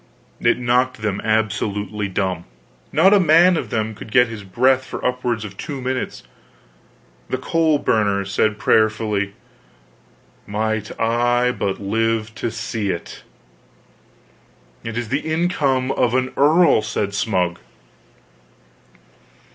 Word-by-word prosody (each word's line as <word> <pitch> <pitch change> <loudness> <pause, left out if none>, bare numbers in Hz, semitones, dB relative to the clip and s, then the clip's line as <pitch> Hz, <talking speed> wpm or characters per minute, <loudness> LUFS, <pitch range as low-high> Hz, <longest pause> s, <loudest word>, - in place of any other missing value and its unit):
It - - +2
knocked 125 -1 0
them 105 -2 -1
absolutely 105 -1 -1
dumb! 95 -3 -2 0.5
Not 190 +6 +5
a 205 - +6
man 175 +1 +5
of - - -3
them 110 0 -2
could 110 +1 -11
get 125 0 +5
his 110 -3 -7
breath 130 +7 +2
for - - -7
upwards 125 -3 -1
of 100 -1 -10
two 140 -3 -5
minutes. 130 0 -3 1.1
Then 130 - -2
the - - -14
coal 160 -2 +2
burner 105 -7 +1
said 100 +2 0
prayerfully: 105 -2 +1 1.1
"Might 110 0 -3
I 120 +2 +2
but 100 -5 -3
live 110 +2 -1
to 115 - -3
see 110 -2 -3
it!" 85 - -5 1.6
"It 115 0 -5
is 120 -2 -3
the 140 +3 0
income 150 -6 0
of 125 -2 +1
an 130 0 0
earl!" 155 -2 +4
said 100 -1 -3
Smug. 90 -5 0
115 Hz, 125 wpm, -20 LUFS, 105-130 Hz, 1.6 s, a